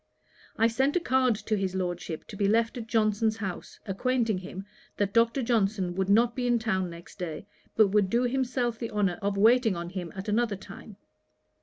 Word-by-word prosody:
I 225 - +4
sent 265 +5 +1
a - - +4
card 260 -7 +2
to 215 +1 -2
his 190 -2 -2
Lordship, 175 -3 -3
to - - -8
be 200 0 +1
left 225 +2 +2
at 230 -3 -6
Johnson's 220 0 +1
house, 190 -5 -6
acquainting 225 0 0
him, 185 +1 -8 0.3
that 200 -1 0
Dr. 230 +3 +3
Johnson 200 -6 0
could 190 0 -1
not 230 +3 +4
be 250 -1 -1
in 240 -1 +3
town 190 -5 -1
next 170 +3 -12
day, 170 0 -5 0.3
but 215 -2 +5
would 205 -1 +2
do 235 +4 +2
himself 250 -2 -1
the 230 - -3
honour 200 -5 0
of 200 0 -1
waiting 225 0 +4
on 170 0 -5
him 180 -3 -5
at 190 +2 -6
another 215 0 +1
time. 195 +1 -12
215 Hz, 195 wpm, -28 LUFS, 190-235 Hz, 0.3 s, but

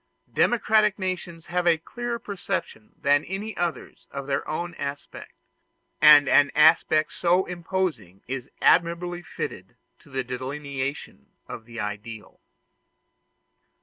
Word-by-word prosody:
Democractic 215 -3 +3
nations 180 -3 -4
have 175 0 -1
a 170 -1 +5
clearer 240 +8 -5
perception 195 - -5
than 145 +1 +3
any 205 +4 -5
others 170 -7 -4
of 140 -1 -6
their 140 0 -2
own 170 +3 -3
aspect; 140 0 -6 0.7
and 150 -2 +8
an 140 0 +5
aspect 155 0 +4
so 180 +2 +2
imposing 170 - -3
is 130 0 -5
admirably 175 +1 +2
fitted - - -7 0.2
to - - -20
the 130 -1 -2
delineation 130 - -5 0.2
of 115 - -8
the 115 0 -9
ideal. 105 +1 -6
155 Hz, 115 wpm, -25 LUFS, 135-180 Hz, 0.7 s, and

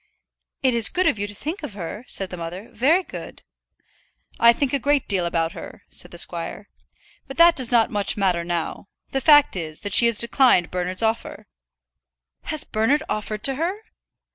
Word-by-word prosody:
"It 260 -2 +3
is 230 -3 +5
good 370 +1 0
of 210 - +1
you 205 - -2
to 205 - -9
think 320 - -5
of 200 - -8
her," 205 +5 -7
said 195 -1 -3
the 180 - -6
mother; 175 +6 -7
"very 280 - +2
good." - - -10 1.0
"I 235 - +7
think 260 +3 -2
a 280 - +1
great 285 +2 0
deal 185 -4 +1
about 165 -1 -1
her," - - -11
said - - -6
the - - -11
squire. - - -5 0.6
"But 270 - -9
that 335 0 +6
does 255 -4 +3
not 235 -2 +3
much 205 -2 0
matter 185 -4 +1
now. 170 +2 -4 0.2
The 270 - -1
fact 295 -4 +5
is, 155 -4 -6
that 205 - -5
she 235 - +6
has 235 -2 +2
declined 235 -6 +4
Bernard's 180 +3 -3
offer." 225 +1 -2 1.0
"Has 310 -2 -1
Bernard 245 +8 0
offered 210 0 -4
to 270 - +2
her?" 370 +5 -2
225 Hz, 190 wpm, -22 LUFS, 185-275 Hz, 1.0 s, I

